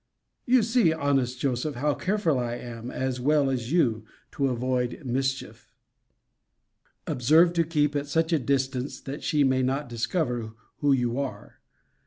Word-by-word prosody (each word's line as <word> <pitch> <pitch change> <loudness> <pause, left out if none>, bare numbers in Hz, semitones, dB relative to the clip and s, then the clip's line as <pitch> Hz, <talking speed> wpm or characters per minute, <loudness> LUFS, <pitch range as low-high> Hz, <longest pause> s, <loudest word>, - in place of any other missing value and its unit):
You 250 -1 +5
see, 225 -6 +3
honest 135 -5 0
Joseph, 135 +2 -1
how 145 +4 +1
careful 185 -8 0
I 120 -1 -2
am, 120 0 -7
as 130 -1 -2
well 140 +1 +2
as 125 -1 -3
you, 120 -11 +2 0.3
to 140 - 0
avoid 125 +2 -2
mischief. 130 +1 -3 1.3
Observe 160 +8 +4
to 170 -1 +2
keep 150 -2 0
at 145 0 -1
such 160 +3 +1
a 160 - +3
distance 135 0 -1
that 140 +2 -7
she 150 -2 +2
may 130 -1 +2
not 135 +2 -1
discover 120 -2 -2 0.2
who 145 -1 +2
you 125 -1 +1
are. 140 -2 -6
135 Hz, 150 wpm, -26 LUFS, 125-150 Hz, 1.3 s, You